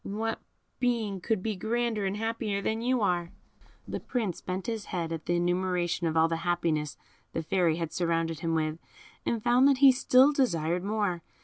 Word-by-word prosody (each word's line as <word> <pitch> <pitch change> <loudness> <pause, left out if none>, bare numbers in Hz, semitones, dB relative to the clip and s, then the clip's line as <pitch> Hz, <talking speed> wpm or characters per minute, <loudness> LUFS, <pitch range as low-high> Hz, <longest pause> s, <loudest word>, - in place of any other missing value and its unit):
What 220 +2 -3 0.4
being 225 -6 0
could 220 -3 -1
be 220 -2 -1
grander 220 0 -1
and 195 +2 -2
happier 225 -2 -2
than 220 +1 -1
you 250 0 +1
are?" 175 -4 +1 0.6
The - - -4
Prince 220 -9 -3
bent 185 +1 -4
his 225 -3 -3
head 170 -3 -3
at 165 -1 -5
the 175 - +2
enumeration 175 -1 0
of 160 0 -1
all 160 0 +5
the 165 0 -1
happiness 165 -3 -1 0.4
the 165 - -2
Fairy 170 -1 +2
had 165 -1 -4
surrounded 165 -2 0
him 165 -1 -1
with, 155 0 -1 0.5
and 230 -2 -1
found 245 +3 +5
that 280 -2 +4
he 275 0 +8
still 260 +2 +5
desired 175 - 0
more. 205 -4 -1
185 Hz, 185 wpm, -28 LUFS, 170-225 Hz, 0.6 s, he